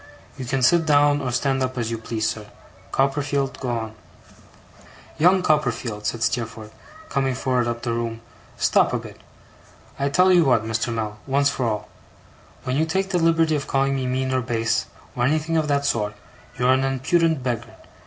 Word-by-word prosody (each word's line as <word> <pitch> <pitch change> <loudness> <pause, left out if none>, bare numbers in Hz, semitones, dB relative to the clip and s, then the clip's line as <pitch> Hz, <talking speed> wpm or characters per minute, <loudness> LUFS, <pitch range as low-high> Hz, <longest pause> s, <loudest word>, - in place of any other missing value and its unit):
You 130 - -6
can 135 +1 -1
sit 165 +5 +4
down 145 -1 +4
or 130 -2 -2
stand 135 +2 0
up 130 0 -2
as 115 -1 -2
you 115 - -3
please, 110 -1 -2
sir. 105 -2 -4 0.4
Copperfield, 140 0 0
go 130 - -3
on.' 110 -2 -3 1.2
'Young 180 +3 +5
Copperfield,' 125 -9 0
said 115 -1 -2
Steerforth, 115 -2 -3 0.3
coming 135 -2 0
forward 125 -2 0
up 120 0 -3
the 120 -1 -1
room, 115 -1 -3 0.4
'stop - - +3
a - - +2
bit. - - -10 0.8
I 140 +1 +1
tell 185 +6 +4
you 175 -2 +6
what, 125 -6 +2
Mr. 115 +1 -1
Mell, 110 -2 -3
once 140 +1 +2
for 130 -3 -1
all. 105 -1 -3 0.7
When 130 +1 -1
you 160 - +2
take 190 +4 -1
the 180 - +2
liberty 165 -1 +3
of 140 - -3
calling 135 0 +1
me 130 -1 -2
mean 130 +1 -1
or 130 - +1
base, 115 -2 0 0.3
or 120 - -1
anything 155 +5 +1
of 155 -2 +1
that 140 -1 +1
sort, 105 -6 0 0.4
you 125 - 0
are 130 - +6
an 130 0 +1
impudent 140 +3 +1
beggar. 120 -3 -3
130 Hz, 185 wpm, -23 LUFS, 115-145 Hz, 1.2 s, you